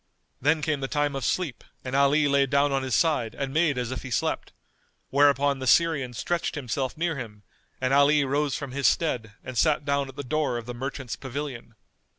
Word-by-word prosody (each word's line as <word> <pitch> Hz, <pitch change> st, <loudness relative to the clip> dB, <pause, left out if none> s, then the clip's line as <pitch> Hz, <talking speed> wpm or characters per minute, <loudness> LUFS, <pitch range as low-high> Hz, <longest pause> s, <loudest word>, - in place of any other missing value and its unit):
Then 155 Hz, +1 st, +2 dB
came 155 Hz, -3 st, 0 dB
the 135 Hz, -, -3 dB
time 145 Hz, 0 st, 0 dB
of 135 Hz, -, -3 dB
sleep 160 Hz, -10 st, -1 dB, 0.2 s
and 130 Hz, +1 st, -3 dB
Ali 140 Hz, +2 st, +4 dB
lay 140 Hz, -1 st, +3 dB
down 140 Hz, +1 st, +2 dB
on 135 Hz, 0 st, +1 dB
his 130 Hz, -3 st, -1 dB
side 130 Hz, -9 st, +1 dB
and 135 Hz, -1 st, -4 dB
made 155 Hz, -3 st, +2 dB
as 125 Hz, 0 st, -2 dB
if 130 Hz, -, -4 dB
he 130 Hz, -, -7 dB
slept; 120 Hz, -, -1 dB, 0.6 s
whereupon 140 Hz, 0 st, +3 dB
the 130 Hz, -, -4 dB
Syrian 145 Hz, -5 st, +3 dB
stretched 170 Hz, +10 st, -2 dB
himself 130 Hz, -1 st, -3 dB
near 165 Hz, -2 st, -1 dB
him 105 Hz, -5 st, -8 dB, 0.4 s
and 130 Hz, +1 st, 0 dB
Ali 145 Hz, +1 st, +5 dB
rose 140 Hz, +1 st, 0 dB
from 140 Hz, -3 st, -6 dB
his 140 Hz, +1 st, +1 dB
stead 120 Hz, -10 st, 0 dB
and 130 Hz, -, -7 dB
sat 150 Hz, +2 st, +2 dB
down 140 Hz, -1 st, 0 dB
at 135 Hz, -, -11 dB
the 145 Hz, -, -5 dB
door 140 Hz, -1 st, -1 dB
of 120 Hz, -, -6 dB
the 125 Hz, -, -6 dB
merchant's 130 Hz, 0 st, -5 dB
pavilion. 130 Hz, -4 st, -6 dB
140 Hz, 205 wpm, -26 LUFS, 130-145 Hz, 0.6 s, Ali